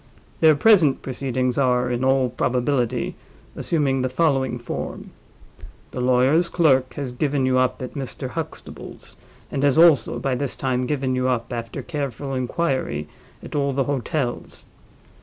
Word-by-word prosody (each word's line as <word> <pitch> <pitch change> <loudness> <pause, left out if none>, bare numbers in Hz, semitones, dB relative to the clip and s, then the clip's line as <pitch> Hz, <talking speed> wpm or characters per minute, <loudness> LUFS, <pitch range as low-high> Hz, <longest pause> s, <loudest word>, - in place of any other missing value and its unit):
Their 160 -2 +6
present 165 -5 +4
proceedings 130 -1 -1
are, 125 -2 +2
in 120 +1 -1
all 130 -1 +3
probability, 125 0 0 0.4
assuming 140 -5 0
the 130 - 0
following 135 -3 +1
form: 120 0 -6 0.8
the 125 - -4
lawyer's 130 +7 +3
clerk 135 -7 +2
has 140 -3 -4
given 135 +1 0
you 130 0 +3
up 130 0 0
at 125 - -6
Mr. 135 -1 -5
Huxtable's, 165 +2 -8 0.4
and 135 - -2
has 145 0 +3
also, 160 -8 +5
by 135 - -1
this 135 +1 -2
time, 125 -1 -1
given 135 -2 -1
you 130 0 0
up, 120 -2 -1
after 115 -1 -5
careful 140 -3 -4
inquiry, 130 - -1 0.4
at - - -8
all 140 -1 +1
the 135 +1 +1
hotels. 140 -1 -3
130 Hz, 145 wpm, -23 LUFS, 125-145 Hz, 0.8 s, Their